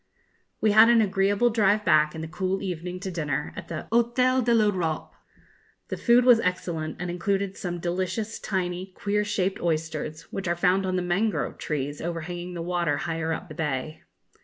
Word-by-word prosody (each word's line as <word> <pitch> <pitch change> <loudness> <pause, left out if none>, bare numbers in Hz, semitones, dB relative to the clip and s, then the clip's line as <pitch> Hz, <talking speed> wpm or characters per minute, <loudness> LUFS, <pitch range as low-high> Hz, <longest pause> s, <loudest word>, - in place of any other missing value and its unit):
We 215 - +4
had 220 +2 +8
an 235 -1 +6
agreeable 205 +3 +2
drive 210 -1 +2
back 155 -1 +4
in 160 - -5
the 160 - -5
cool 190 +4 -2
evening 180 -1 -4
to 190 - -4
dinner 150 -4 -2
at - - -8
the - - -6
Hôtel 250 +2 +3
de 240 - +1
l'Europe. 190 -8 +1 0.8
The - - -2
food 240 0 +4
was 245 -3 +7
excellent, 170 -5 -2
and 180 0 -3
included 195 +2 -1
some 175 -1 -4
delicious 185 +5 -2
tiny 185 -1 -2
queer 210 +1 0
shaped 195 -2 -1
oysters, 155 -1 -2
which 195 - -4
are 170 - +1
found 185 +2 +2
on 185 - 0
the 180 - 0
mangrove 180 -1 -1
trees, 145 -1 -3
overhanging 175 +1 -5
the 170 - -4
water 170 -4 0
higher 165 0 -2
up 170 +4 -4
the 155 - -9
bay. 150 0 -3
180 Hz, 180 wpm, -26 LUFS, 165-205 Hz, 0.8 s, had